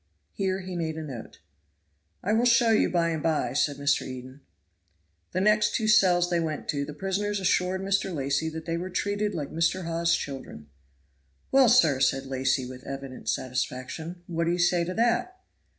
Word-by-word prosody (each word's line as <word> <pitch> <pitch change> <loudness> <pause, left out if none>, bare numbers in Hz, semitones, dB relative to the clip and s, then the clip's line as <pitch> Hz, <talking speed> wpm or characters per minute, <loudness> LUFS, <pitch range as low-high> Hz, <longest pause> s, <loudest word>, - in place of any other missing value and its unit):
Here 190 -1 -1
he 185 -1 -6
made 160 -2 -2
a 160 - -4
note. 130 -7 -9 0.8
"I 205 - +1
will 230 +2 +3
show 235 -1 +5
you 215 - +3
by 170 -1 +1
and 160 -2 -2
by," 160 -1 0
said 145 - +1
Mr. 145 +1 +2
Eden. 130 +2 -8 0.9
The 185 - -1
next 210 +1 +3
two 220 -3 0
cells 180 -4 +4
they 170 - +2
went 155 -2 -3
to, 140 -1 0
the 150 0 -8
prisoners 200 +4 -1
assured 185 0 +1
Mr. 195 0 0
Lacy 140 0 -1
that 160 0 -7
they 165 0 -2
were 180 +2 -4
treated 205 +2 -1
like 145 -4 -4
Mr. 165 +3 0
Hawes's 170 0 +1
children. 130 - -7 0.8
"Well, 265 -3 +6
sir!" 160 - +5
said 135 0 +1
Lacy, 130 0 0
with 130 0 -9
evident 135 -1 -6
satisfaction, 130 +7 -3
"what 170 -1 -2
do 170 - +1
you - - -1
say 175 0 +3
to 180 +1 -4
that?" 240 +11 +1
170 Hz, 180 wpm, -27 LUFS, 140-195 Hz, 0.9 s, Well